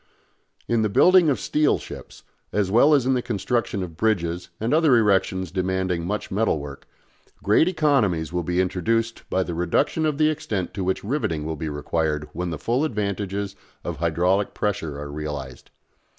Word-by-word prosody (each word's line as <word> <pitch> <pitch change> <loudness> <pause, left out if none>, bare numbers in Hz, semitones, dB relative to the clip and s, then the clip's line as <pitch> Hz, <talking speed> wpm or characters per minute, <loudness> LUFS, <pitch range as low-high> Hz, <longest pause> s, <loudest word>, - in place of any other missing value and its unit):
In 115 -1 +2
the 110 - +1
building 180 - +5
of 130 -7 +1
steel 150 +10 +2
ships, - - -10 0.3
as 100 -2 0
well 140 +8 +6
as 135 -4 +2
in 130 - +3
the 125 - +1
construction 115 -3 -1
of 85 -3 -8
bridges 90 -5 0
and 115 +5 0
other 155 -5 +5
erections 95 -4 +1
demanding 95 -2 -1
much 105 +2 -3
metal 105 -3 +1
work, 70 -1 -9 0.6
great 105 - +4
economies 120 - +1
will 90 - 0
be 90 +2 -1
introduced 115 +5 -1
by 95 - +1
the 90 - -5
reduction 90 - +1
of 150 -2 -1
the 155 0 +4
extent 105 - -3
to 95 - -3
which 95 +1 -1
riveting 100 - -2
will 80 0 -3
be 80 +1 -4
required 75 0 -2
when 90 +2 -3
the 80 - -4
full 120 - 0
advantages 100 -5 -2 0.3
of 85 -3 -4
hydraulic 90 +5 +1
pressure 80 -8 -2
are 70 0 -6
realised. 75 -4 -6
95 Hz, 175 wpm, -24 LUFS, 85-115 Hz, 0.6 s, well